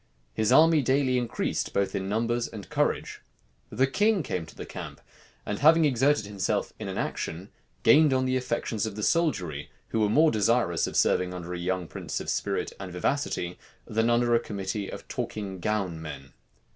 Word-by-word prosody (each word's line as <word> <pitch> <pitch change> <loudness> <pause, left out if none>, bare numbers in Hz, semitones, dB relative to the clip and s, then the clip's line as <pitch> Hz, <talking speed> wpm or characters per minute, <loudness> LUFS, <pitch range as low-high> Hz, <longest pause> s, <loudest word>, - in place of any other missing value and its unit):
His 110 +7 +1
army 160 -1 +6
daily 130 -1 +2
increased 120 -2 -2
both 100 0 0
in 95 0 -2
numbers 115 +3 0
and 105 -4 -10
courage. - - -1 0.5
The 130 +5 +2
king 205 +6 +2
came 90 - -3
to - - -14
the - - -7
camp; - - -8 0.5
and 105 - -3
having 160 +2 +6
exerted 135 -2 +2
himself 100 -1 -2
in - - -5
an - - -4
action, 90 +6 -4 0.3
gained 150 +6 +6
on 130 0 +2
the 130 0 +1
affections 120 -3 -1
of 105 - -6
the 105 - -4
soldiery, 95 - 0 0.2
who 115 - -1
were 105 -1 +3
more 155 +8 +5
desirous 110 -5 +2
of - - -6
serving 90 0 +2
under 90 0 -6
a 90 - -4
young 90 0 -2
prince - - -5
of - - -3
spirit - - -2
and 95 -2 -6
vivacity, 90 -3 -2 0.3
than 110 +2 +1
under 120 0 +3
a 115 - +5
committee 100 -1 -4
of - - -8
talking 110 -6 -4
gown 95 -4 -1
men. 70 -3 -8
110 Hz, 185 wpm, -27 LUFS, 95-130 Hz, 0.5 s, army